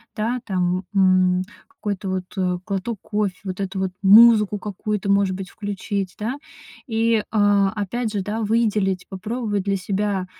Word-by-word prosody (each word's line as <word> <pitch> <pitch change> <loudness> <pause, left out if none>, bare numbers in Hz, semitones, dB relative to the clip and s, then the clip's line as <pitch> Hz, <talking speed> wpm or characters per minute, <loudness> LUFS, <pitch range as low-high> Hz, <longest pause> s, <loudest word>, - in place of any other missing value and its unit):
да. 230 +3 -1
Там, 185 -2 0
м, 185 -1 +4 0.3
какой-то 200 -2 -5
вот, 185 -1 -2
э, 180 -2 0
глоток 205 +2 -3
кофе, 205 -3 -1
вот 185 0 -5
эту 195 0 -4
вот 190 -1 -1
музыку 210 0 +7
какую-то, 205 0 -3
может 200 -2 +2
быть, 190 -1 -7
включить, 200 -2 -4
да. 240 +6 -3 0.5
И, 225 -1 +1
а, 205 -2 +3
опять 220 +2 -2
же, 205 -2 -2
да, 215 +3 -3
выделить, 210 -4 +1
попробовать 205 +1 -3
для 200 -1 +1
себя. 195 0 -1
200 Hz, 150 wpm, -22 LUFS, 190-215 Hz, 0.5 s, музыку